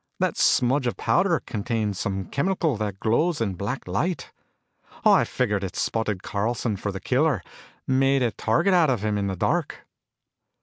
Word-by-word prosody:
That - - +1
smudge 130 +1 +3
of 120 - -2
powder 175 -2 +2
contained 110 -1 -2
some 95 -1 -3
chemical 165 - 0
that 105 -2 -4
glows 150 +11 +1
in 105 -4 -1
black 100 +8 -4
light. 175 +2 -2 0.7
I - - +6
figured 100 -1 -1
it 95 0 -5
spotted 105 -4 -1
Carlson 110 +2 -1
for 100 +1 -4
the 95 - -6
killer, 130 - +1 0.4
made 135 0 +2
a 120 - +1
target 115 - +1
out 170 -4 +4
of 120 -6 0
him 105 -1 0
in 100 - -1
the 95 - -2
dark." - - -1
115 Hz, 165 wpm, -25 LUFS, 100-140 Hz, 0.7 s, I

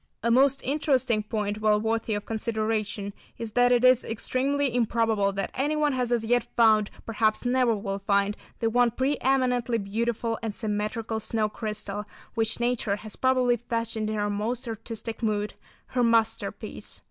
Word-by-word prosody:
A 235 - +2
most 270 +2 +4
interesting 260 -5 +1
point, 210 0 -3
well 210 -1 +4
worthy 225 0 -1
of 205 - -4
consideration, 215 -2 -2 0.2
is 230 -2 -5
that 245 +2 +4
it 245 0 +4
is 255 -1 +6
extremely 265 +4 0
improbable 225 -4 +2
that 195 -1 -2
anyone 295 +2 +1
has 250 -2 -1
as 235 -2 +1
yet 245 +2 +2
found, 215 -3 +5 0.2
perhaps 220 +1 +1
never 245 -2 +3
will 200 -1 -3
find, 200 +1 +1 0.3
the 225 -1 +1
one 245 +1 +4
preëminently 250 -3 +1
beautiful 230 +2 -1
and 220 -3 -3
symmetrical 220 +1 -2
snow 220 0 0
crystal 210 -2 -4 0.3
which 225 -1 -1
nature 240 -4 0
has 210 0 -8
probably 255 -2 +3
fashioned 230 -2 -2
in 215 - -2
her 205 -1 0
most 230 +5 -2
artistic 225 0 -6
mood—her 215 +3 -3
masterpiece. 225 -1 0
225 Hz, 150 wpm, -27 LUFS, 215-245 Hz, 0.3 s, is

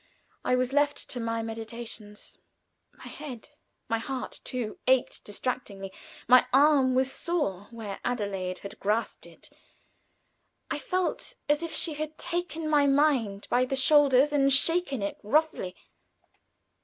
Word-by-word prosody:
I 250 - +2
was 255 +1 0
left 290 0 +1
to 250 - -3
my 230 -1 -2
meditations. 225 -2 -6 0.5
My - - -17
head 270 -7 -8 0.4
my 230 - 0
heart 260 +2 -5
too 240 -4 -4
ached 260 -1 +2
distractingly; 205 -3 -4 0.3
my 250 +1 +6
arm 270 -2 +5
was 260 +1 +2
sore 205 - -2
where 220 -4 -7
Adelaide 200 -6 -2
had 200 - -8
grasped 215 +3 -1
it; - - -13 1.2
I - - -1
felt 365 -1 -2
as 295 +1 +2
if 335 -1 -4
she 325 - +1
had 310 +1 -5
taken 335 -2 -3
my 295 -2 +4
mind 275 -8 +2
by 245 +1 +4
the 255 +1 -1
shoulders 280 0 +5
and 275 -1 +3
shaken 280 - +3
it 200 - -4
roughly. 260 - 0
255 Hz, 135 wpm, -28 LUFS, 225-295 Hz, 1.2 s, my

